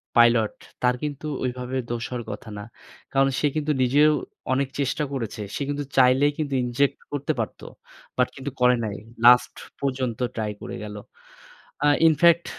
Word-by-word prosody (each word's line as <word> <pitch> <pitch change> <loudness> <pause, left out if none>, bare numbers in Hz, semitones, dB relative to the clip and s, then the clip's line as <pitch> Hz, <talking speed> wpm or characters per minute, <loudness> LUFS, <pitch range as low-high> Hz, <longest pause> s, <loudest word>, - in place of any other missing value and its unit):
Pilot 120 -2 +5 0.3
তার 125 0 +3
কিন্তু 150 0 -4 0.2
ওইভাবে 125 0 -3
দোষ 120 -1 -3
হওয়ার 125 -2 -4
কথা 110 - -8
না। 105 - -6 0.5
কারণ 135 0 +3
সে 150 - +2
কিন্তু 155 0 0
নিজেও 145 +4 +5 0.4
অনেক 135 0 +1
চেষ্টা 140 +2 0
করেছে। 115 -4 -4
সে - - -4
কিন্তু 145 0 -2
চাইলে 130 +2 +5
কিন্তু 145 -3 -2
ইনজেক্ট 125 +3 +1
করতে 145 -1 -1
পারতো। - - -4 0.5
বাট 125 - +3
কিন্তু 135 0 -5
করে 125 0 +6
নাই। 105 -2 -3 0.3
লাস্ট 125 0 +7 0.3
পর্যন্ত 130 -4 -2 0.2
ট্রাই 110 -2 -2
করে 120 - -6
গেল। 105 0 -7 0.9
আ - - +5 0.2
ইনফেক্ট 170 +2 +5
130 Hz, 155 wpm, -24 LUFS, 120-145 Hz, 0.9 s, লাস্ট